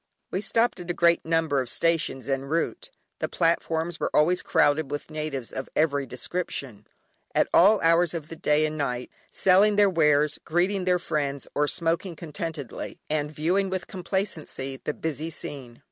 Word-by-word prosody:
We 190 - -1
stopped 230 -1 +1
at 175 0 -8
a 175 - -1
great 170 0 +3
number 160 -4 +1
of 125 - -4
stations 165 -6 0
en 135 0 -1
route. 160 +4 -2 0.3
The - - -2
platforms 165 0 0
were - - 0
always 175 +4 +4
crowded 155 -3 +2
with 145 +2 -5
natives 150 -5 -4
of 130 - -5
every 145 -3 +1
description, 130 - -4 0.5
at - - +3
all 205 +4 +6
hours 165 +1 +3
of 155 -3 -5
the 165 - -8
day 150 -1 +2
and 155 0 -4
night, 125 -3 -2 0.2
selling 195 +3 +4
their 205 -1 +5
wares, 150 -3 +3
greeting 180 +3 0
their 180 -1 +3
friends, 145 -5 -2
or 150 0 +1
smoking 165 +3 -1
contentedly, 155 -4 -6
and 150 -1 0
viewing 180 +6 0
with 185 -1 -3
complacency 175 -8 -4
the 150 - -2
busy 160 0 -3
scene. 130 -6 -8
160 Hz, 165 wpm, -26 LUFS, 145-175 Hz, 0.5 s, all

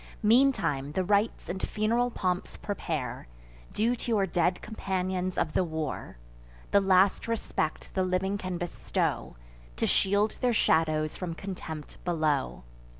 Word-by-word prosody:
Meantime 210 - +3
the 185 - +1
rites 205 +4 +1
and 190 +2 -4
fun'ral 230 +3 +1
pomps 180 -5 -2
prepare, 200 - -4 0.4
Due 230 +3 +1
to 245 - -7
your 210 -4 +3
dead 175 0 +1
companions 185 -3 -2
of 155 - 0
the - - +3
war: 160 - -4 0.5
The 200 - +5
last 190 +2 +4
respect 225 -8 -2
the 190 - +1
living 185 +2 0
can 185 -2 -3
bestow, 175 0 -2 0.4
To - - 0
shield 205 +2 +2
their 245 -1 +3
shadows 155 -6 +2
from 175 -3 -4
contempt 165 -5 -7
below. 155 - 0
185 Hz, 135 wpm, -29 LUFS, 165-205 Hz, 0.5 s, The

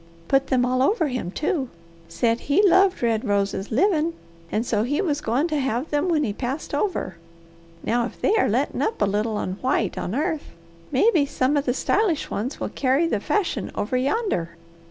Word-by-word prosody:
Put 270 0 +2
them 250 -2 +2
all 255 +1 +1
over 320 - +2
him, 250 -9 -3
too! 295 - -1 0.4
Said 230 +7 0
he 395 +8 +5
loved 375 -3 +4
red 225 -2 +1
roses 200 -1 -1
livin' 330 - +2 0.4
and 220 +3 0
so 215 -3 +1
he 275 +7 0
was 295 -7 0
goin' 255 +7 +1
to 305 -2 0
have 265 +2 -2
them 295 +4 +1
when 310 -3 +2
he 210 - -1
passed 265 +8 -4
over. 285 - -1 0.7
Now 235 +1 +1
if - - -14
they - - +2
are - - +3
lettin' - - 0
up 440 - -1
a 205 - +3
little 210 +2 -1
on 185 -1 -3
white 255 -6 0
on 195 - -3
earth, 315 +1 -2 0.4
mebby 295 - +3
some 275 0 +1
of 285 0 +1
the 245 - 0
stylish 375 -3 0
ones 240 +7 -3
will - - -3
carry 275 +4 +1
the 275 -11 0
fashion 395 - -1
over 220 +5 -2
yander. 255 - -1
265 Hz, 195 wpm, -23 LUFS, 225-320 Hz, 0.7 s, he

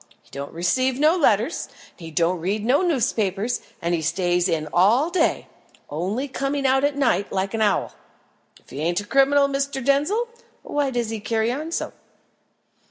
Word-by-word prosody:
He - - -27
don't 140 +1 -6
receive 255 +10 0
no 310 +3 +4
letters, 245 - +1 0.3
he 165 -3 -10
don't 170 +3 +1
read 200 +5 -2
no 260 +7 +3
newspapers, 230 - 0 0.2
and 170 -1 0
stays 175 +2 +1
in 155 -2 -1
all 230 - +4
day, 345 -2 +1 0.5
only 195 - -2
coming 275 +1 -2
out 265 +1 +3
at 285 0 +1
night, 240 -7 +1
like 195 +1 -2
an 225 - -1
owl. 205 -2 +1 0.7
If - - -23
he 135 - -7
ain't 170 +3 0
a 205 - -7
criminal, 275 +4 +4
Mr. 275 -2 -2
Denzil, 300 +13 +2 0.4
why 290 -2 -1
does 240 -3 -2
he 225 - -3
carry 220 +2 0
on 305 +6 -4
so?" - - -3
235 Hz, 165 wpm, -23 LUFS, 185-280 Hz, 0.7 s, no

